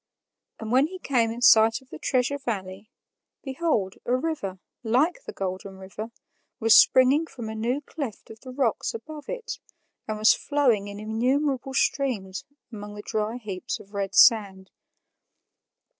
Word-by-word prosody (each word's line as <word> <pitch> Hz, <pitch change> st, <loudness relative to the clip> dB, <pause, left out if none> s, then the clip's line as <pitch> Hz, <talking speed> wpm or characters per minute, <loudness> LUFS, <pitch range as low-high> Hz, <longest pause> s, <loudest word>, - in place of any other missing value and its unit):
And 220 Hz, 0 st, -6 dB
when 265 Hz, +4 st, +4 dB
he 370 Hz, +3 st, -8 dB
came 245 Hz, -9 st, +1 dB
in 235 Hz, +2 st, -5 dB
sight 225 Hz, -1 st, +6 dB
of 265 Hz, -, -25 dB
the -, -, -8 dB
Treasure 260 Hz, +2 st, 0 dB
Valley, 200 Hz, -4 st, -5 dB, 0.5 s
behold, 265 Hz, -, -1 dB
a 245 Hz, -, +1 dB
river, 255 Hz, -, -3 dB, 0.2 s
like 275 Hz, -, +1 dB
the -, -, -6 dB
Golden 190 Hz, 0 st, -5 dB
River, 195 Hz, +4 st, -8 dB, 0.5 s
was 225 Hz, 0 st, +5 dB
springing 270 Hz, +5 st, +5 dB
from 235 Hz, -7 st, -8 dB
a -, -, -5 dB
new 240 Hz, +6 st, -1 dB
cleft 275 Hz, -9 st, -7 dB
of 220 Hz, -, -12 dB
the 260 Hz, -, -12 dB
rocks 255 Hz, -, -1 dB
above 310 Hz, -9 st, -9 dB
it -, -, -5 dB, 0.5 s
and 215 Hz, -1 st, -3 dB
was 215 Hz, +1 st, +6 dB
flowing 250 Hz, -9 st, +1 dB
in 200 Hz, 0 st, -8 dB
innumerable 260 Hz, +5 st, -1 dB
streams 250 Hz, -, -1 dB, 0.3 s
among 205 Hz, -1 st, -8 dB
the 205 Hz, -, -8 dB
dry 220 Hz, +2 st, -2 dB
heaps 200 Hz, -6 st, -5 dB
of 200 Hz, -, -16 dB
red 195 Hz, -1 st, -3 dB
sand. 195 Hz, -5 st, +4 dB
230 Hz, 155 wpm, -25 LUFS, 205-270 Hz, 0.5 s, sight